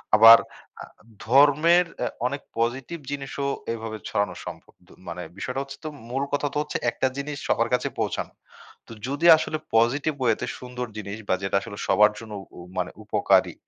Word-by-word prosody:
আবার 115 +1 +10 0.9
ধর্মের 145 +8 +5 0.2
আ - - 0 0.2
অনেক 140 +2 -4 0.2
পজিটিভ 125 +8 -2
জিনিসও 140 0 -3 0.3
এভাবে 110 -1 -5
ছড়ানো 100 -1 -1
সম্ভব। - - -9 0.3
মানে 90 +1 -5
বিষয়টা 125 +6 -3
হচ্ছে 135 0 -10 0.3
মূল 135 +3 -1
কথা 145 0 +1
তো - - -2
হচ্ছে, 150 - -3
একটা 130 - 0
জিনিস 140 +1 -4
সবার 115 +1 +1
কাছে 125 - +1
পৌঁছানো। - - -2 0.5
তো - - -13 0.2
যদি 140 +5 -2
আসলে 155 0 -2 0.2
পজিটিভ 135 +7 +3
ওয়েতে 115 -4 +1
সুন্দর 125 0 -6
জিনিস 105 0 -5
বা - - +4
যেটা 95 0 +1
আসলে 100 -2 -9
সবার 105 0 +5
জন্য 110 -2 -9 0.4
মানে 90 0 -1
উপকারী - - +2
125 Hz, 155 wpm, -25 LUFS, 110-140 Hz, 0.9 s, আবার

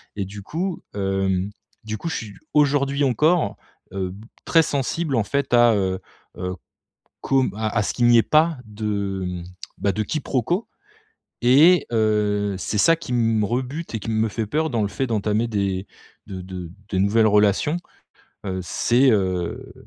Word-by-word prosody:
et 100 - -2
du 100 +2 -9
coup, 175 - -3
hem, 95 -1 0 0.3
du 110 0 -4
coup 170 - -6
je - - -3
suis, 105 -2 -6 0.2
aujourd'hui 140 -1 +2
encore, 150 +6 +2 0.4
heu, 95 -1 -2
b 100 +3 -11 0.2
très 165 -1 +5
sensible 145 +1 -1
en 110 - +2
fait 140 +2 -1
à, 120 -1 +6
heu, 95 -2 0 0.4
heu, 90 0 -3 0.7
comme 135 -5 +2
à 110 0 -1
à 105 - +3
ce - - -2
qu'il 120 - +1
n'y 120 0 +6
ait 115 - +5
pas 155 0 +3
de, 105 -2 -3
hem, 90 -1 -4 0.4
bah, 100 - +1
de 110 - -1
quiproquo. 155 - -1 0.8
Et, 150 +9 +6
heu, 105 -2 +1
c'est 105 - -2
ça 165 +10 +5
qui 160 -6 -7
me 115 -3 +2
rebute 130 +7 -3
et 110 - -2
qui 115 - -5
me 110 0 +1
fait 110 +1 -3
peur 155 +8 0
dans 115 -3 0
le 100 - 0
fait 130 +6 -2
d'entamer 110 0 0
des 100 -3 -1 0.4
de 95 -3 -7
de 90 -2 -7 0.2
de 95 - 0
nouvelles 105 +4 +3
relations. 105 - +3 0.7
Heu, 95 -1 -2
c'est, 125 +8 +3
heu, 95 -5 -1
110 Hz, 170 wpm, -22 LUFS, 100-135 Hz, 0.8 s, à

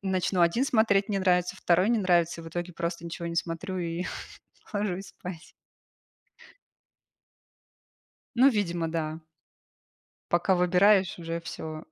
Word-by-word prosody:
начну 185 -1 0
1 170 +10 +3
смотреть- 220 -5 +3
не 200 - +1
нравится, 180 0 +1
2- 180 +4 +2
не 235 - +3
нравится 175 -3 +2
и - - -11
в - - -7
итоге 175 +2 -5
просто 170 0 -4
ничего 170 0 -5
не 170 - -5
смотрю, 170 +3 -3
и 170 0 -3 0.7
ложусь 200 -2 -2
спать. 180 -2 -9 2.8
Ну, 260 +3 +6
видимо, 175 -7 -1
да. 160 -1 -3 1.1
Пока 175 +2 +3
выбираешь, 185 +1 +4
уже 165 0 -4
всё, 155 -1 -7
180 Hz, 125 wpm, -27 LUFS, 170-195 Hz, 2.8 s, Ну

